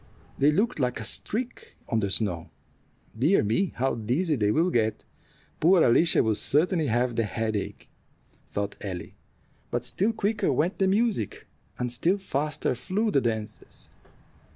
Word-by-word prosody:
They 145 +2 +5
looked 210 +5 0
like 125 -3 0
a - - -5
streak 235 - -3
on 115 - +1
the 100 -2 -1
snow. 95 -5 -1 0.7
"Dear 145 - +3
me, 115 - 0
how 135 +2 0
dizzy 130 - 0
they 105 -5 +1
will 165 +11 +2
get! 110 -2 0 0.5
Poor 175 +1 +5
Alicia 160 +8 +4
will 110 - +2
certainly 155 - +1
have 120 +1 +1
the 115 - +1
headache," 110 0 -3 0.6
thought 100 0 -3
Ellie; 90 -4 -6 0.6
but - - -2
still 205 +5 +1
quicker 215 -4 0
went 160 +9 0
the 190 - +3
music, 200 - 0 0.3
and 125 -1 -2
still 175 +10 +2
faster 150 -6 -1
flew 200 - -1
the 140 - +3
dancers. 110 -2 -5
135 Hz, 150 wpm, -27 LUFS, 110-185 Hz, 0.7 s, They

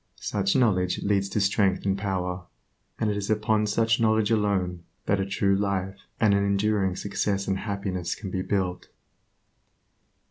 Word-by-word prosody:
Such 100 -2 -1
knowledge 95 -8 +2
leads 100 -1 +1
to 105 - -1
strength 100 -1 +1
and 95 -1 +2
power, 90 -2 -3 0.5
and 110 - 0
it 105 - -2
is 100 0 -4
upon 110 0 +1
such 115 +2 +2
knowledge 110 -1 +2
alone 95 -5 0 0.2
that 100 - +1
a 95 - -1
true 100 0 +1
life 95 -1 -2 0.2
and 110 -3 +4
an 100 0 +2
enduring 100 -1 +1
success 100 0 -2
and 95 0 0
happiness 95 -4 -3
can 95 -3 -7
be 95 - -1
built. 95 -2 -2
100 Hz, 155 wpm, -26 LUFS, 95-105 Hz, 0.5 s, and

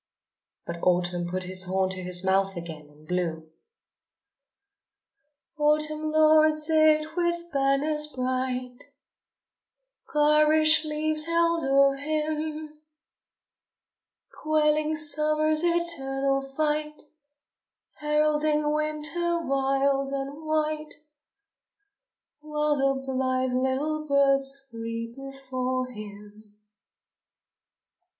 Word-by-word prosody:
But 170 0 -7
Autumn 175 -1 0
put 185 +1 -3
his 185 +1 +2
horn 190 0 -1
to 185 0 -2
his 180 0 -1
mouth 195 +1 +1
again 160 -3 -9
and 150 +1 -21
blew: 160 -3 -3 2.1
Autumn 305 +1 +1
lords 310 0 +3
it 310 0 +3
with 345 -1 -2
banners 285 +2 +1
bright 255 -1 -3
Of - - -29
garish 305 +1 +5
leaves 305 0 0
held 335 0 +1
o'er 275 0 +3
him, 305 +1 -4 1.6
Quelling 305 0 +1
Summer's 305 +1 +1
eternal 275 -6 0
fight, 300 +2 -3 1.0
Heralding 300 0 +1
Winter, 305 +3 -1
wild 275 0 0
and 275 +3 -5
white, 310 0 -2 1.4
While 300 0 -1
the 270 0 0
blithe 260 -1 -1
little 280 +4 -1
birds 275 -1 +2
flee 230 -1 -6
before 260 -2 -4
him. 210 -1 -12
285 Hz, 85 wpm, -26 LUFS, 255-310 Hz, 2.1 s, garish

